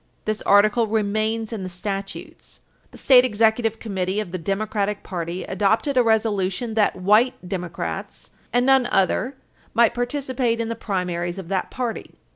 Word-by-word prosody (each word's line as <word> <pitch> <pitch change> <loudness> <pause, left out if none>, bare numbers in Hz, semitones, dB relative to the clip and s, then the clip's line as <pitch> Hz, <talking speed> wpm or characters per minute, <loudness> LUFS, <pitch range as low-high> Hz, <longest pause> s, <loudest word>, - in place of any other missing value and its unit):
This 215 0 -2
article 210 +3 +4
remains 215 +1 -1
in 215 - -4
the 185 - -5
statutes. 195 +2 -7 0.3
The - - -14
State 255 -2 +6
Executive 225 -1 +1
Committee 190 -2 -2
of 210 -5 -4
the 185 - -4
Democratic 205 +3 -2
party 175 0 -4
adopted 210 - 0
a 255 - +5
resolution 220 -1 0
that 215 -2 +2
white 215 +7 +3
Democrats 180 -3 -5 0.2
and 245 +1 +2
none 265 -2 +4
other 210 +8 +1 0.4
might 235 -1 +4
participate 245 -1 -1
in 230 0 -2
the 230 - -2
primaries 180 -4 -3
of 185 -3 -8
that 190 -2 -1
party. 245 -3 -5
215 Hz, 150 wpm, -23 LUFS, 190-230 Hz, 0.4 s, State